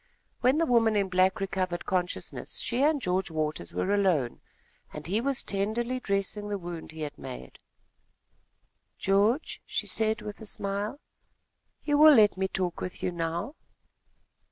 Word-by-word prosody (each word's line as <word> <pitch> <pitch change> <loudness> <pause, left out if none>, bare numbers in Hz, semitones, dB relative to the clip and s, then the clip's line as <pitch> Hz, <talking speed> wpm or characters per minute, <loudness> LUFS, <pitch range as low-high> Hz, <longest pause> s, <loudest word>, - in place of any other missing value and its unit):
When 255 +3 +3
the 330 - +3
woman 230 -4 +3
in 200 -2 +1
black 185 +1 +3
recovered 185 -2 -2
consciousness, 180 -2 -2
she 245 +2 -1
and 295 +1 +3
George 185 -4 -1
Waters 155 - -2
were 200 - 0
alone, 180 -12 +1 0.5
and 150 - -8
he 205 +6 0
was 275 +1 +1
tenderly 225 +6 -1
dressing 200 -1 -2
the 205 - -1
wound 175 -3 -7
he 160 0 -9
had 145 -1 -5
made. 60 0 -9 1.4
"George," 205 +9 +1
she - - -2
said 220 -1 +1
with 210 +1 -7
a 220 - -8
smile, 205 +7 -3 0.8
"you 290 -1 +2
will 305 -1 +9
let 210 -4 +6
me 190 0 0
talk 185 -2 -3
with 185 - -6
you 180 - 0
now?" 170 - -3
195 Hz, 155 wpm, -28 LUFS, 180-225 Hz, 1.4 s, will